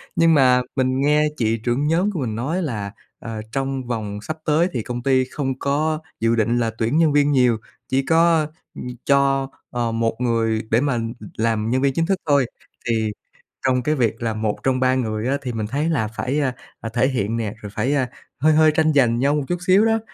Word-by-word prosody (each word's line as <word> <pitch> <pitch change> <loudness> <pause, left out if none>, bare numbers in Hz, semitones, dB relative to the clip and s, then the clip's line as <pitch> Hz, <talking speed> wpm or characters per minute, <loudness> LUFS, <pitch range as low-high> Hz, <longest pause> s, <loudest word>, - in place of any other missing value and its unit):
Nhưng 165 -1 +4
mà 125 -3 +5
mình 130 0 +1
nghe 150 +2 +3
chị 115 -2 +1
trưởng 120 +6 -1
nhóm 175 +6 +2
của 180 - -4
mình 115 -6 -2
nói 150 +11 -2
là, 105 - -3 0.3
ờ, 110 -1 -6
trong 135 +1 -2
vòng 105 -4 -3
sắp 155 +7 -5
tới 155 +3 +3
thì 120 - -1
công 120 +1 -5
ty 130 -1 +3
không 130 0 -4
có 155 +3 0 0.2
dự 115 +1 +2
định 115 +1 +1
là 115 -1 0
tuyển 115 +7 0
nhân 160 -2 +4
viên 145 0 +3
nhiều, 125 -4 +3 0.3
chỉ 135 +1 +2
có, 165 -1 +3 0.3
ừm, - - -6 0.2
cho, 135 -1 +2 0.2
ờ, 120 -1 -1
một 115 0 0
người 115 -2 +1
để 115 +2 +4
mà 140 -3 0 0.4
làm 110 -1 0
nhân 130 +2 +1
viên 140 -1 +2
chính 165 +4 +1
thức 195 +2 +1
thôi. 140 -3 +4 0.4
Thì 110 -2 +1 0.5
trong 125 -1 +2
cái 155 +3 +1
việc 115 -4 0
là 115 -1 -1
một 110 -1 -1
trong 130 -1 +1
ba 130 0 +3
người 110 -3 -2
á, 140 +2 +1
thì 125 -3 -4
mình 110 -2 -3
thấy 145 +7 -1
là 130 -10 0
phải, 125 +6 -2
a, 135 -4 0 0.2
ờ, 115 - -5
thể 120 +2 +3
hiện 115 -4 -1
nè, 110 -3 -3
rồi 105 - -7
phải, 120 +5 0
a, 130 -3 +1 0.3
hơi 155 +4 +4
hơi 155 0 +5
tranh 155 0 +2
giành 120 -5 +3
nhau 140 +3 +2
một 150 - 0
chút 175 - -1
xíu 195 +4 +5
đó, 225 0 +2
130 Hz, 225 wpm, -21 LUFS, 115-145 Hz, 0.5 s, mà